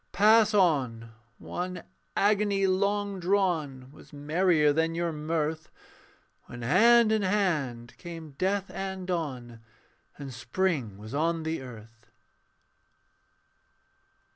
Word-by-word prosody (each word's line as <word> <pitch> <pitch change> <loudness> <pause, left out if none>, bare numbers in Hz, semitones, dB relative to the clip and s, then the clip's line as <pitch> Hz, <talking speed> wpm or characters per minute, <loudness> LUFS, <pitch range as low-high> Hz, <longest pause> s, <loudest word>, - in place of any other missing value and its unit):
Pass 215 +1 +5
on: 130 - +1 0.3
one 180 +1 -5 0.3
agony 205 -1 +2
long 200 +1 0
drawn 170 -9 -1
Was 150 - -17
merrier 150 +1 +2
than 165 +2 0
your 170 0 -1
mirth, 155 0 -3 0.8
When 120 -1 -9
hand 225 - +5
in 220 -1 +2
hand 155 - -1
came 165 -3 -9
death 190 +6 -2
and 190 0 -5
dawn, 130 -10 -4 0.6
And 140 -3 -8
spring 130 - -2
was 110 +2 -10
on 165 +2 0
the 160 -2 -3
earth. 120 -2 -13
165 Hz, 105 wpm, -28 LUFS, 140-195 Hz, 0.8 s, Pass